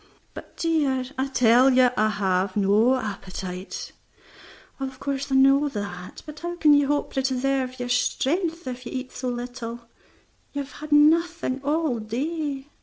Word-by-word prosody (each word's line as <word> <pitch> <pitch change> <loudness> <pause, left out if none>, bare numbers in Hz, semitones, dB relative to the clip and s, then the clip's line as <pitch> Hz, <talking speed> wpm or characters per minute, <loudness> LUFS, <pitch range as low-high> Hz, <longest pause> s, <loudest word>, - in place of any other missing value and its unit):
"But, - - -11
dear 290 -6 +1
" - - -21
"I 265 - +1
tell 250 0 +5
you 255 -1 +5
I 215 -1 +2
have 190 -2 0
no 210 +6 +4
appetite." 190 -5 -6 0.9
"Of 265 -1 -5
course 275 0 -3
I - - +2
know 275 +2 +5
that; 200 -6 -7
but 300 0 -9
how 345 +1 -4
can 310 -3 +5
you 285 -1 +4
hope 290 0 -1
to 270 - 0
preserve 260 0 -1
your 245 - -3
strength 325 +7 0
if 250 -1 -6
you - - -7
eat 255 -1 -5
so 255 0 -4
little? 240 -1 -5 0.7
You 285 0 -2
have 275 - -14
had 305 0 -10
nothing 310 -2 +3
all 295 -4 0
day." 275 +5 -3
265 Hz, 165 wpm, -24 LUFS, 235-290 Hz, 0.9 s, tell